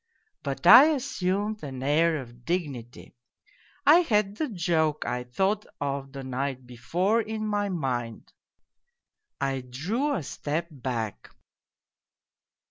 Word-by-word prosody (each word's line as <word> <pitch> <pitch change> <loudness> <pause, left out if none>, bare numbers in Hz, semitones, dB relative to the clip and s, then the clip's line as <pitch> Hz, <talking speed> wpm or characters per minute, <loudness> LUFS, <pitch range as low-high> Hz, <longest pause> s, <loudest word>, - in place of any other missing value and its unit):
But 140 +4 -5
I 240 +10 +11
assumed 205 -3 -2
an 130 -3 -6
air 160 +3 +3
of 120 -3 -10
dignity. 140 -8 -4 0.7
I 310 +4 +8
had 210 - +1
the 310 - -1
joke 165 -6 0
I 125 +1 -2
thought 195 +11 0
of 140 -1 -3
the 135 -1 -7
night 130 0 -3
before 175 - 0
in 220 0 -4
my 205 -1 0
mind. 125 - -3 1.1
I 135 -1 -1
drew 195 - -2
a 165 - -3
step 155 +5 -3
back. 115 - -4
155 Hz, 120 wpm, -27 LUFS, 130-205 Hz, 1.1 s, I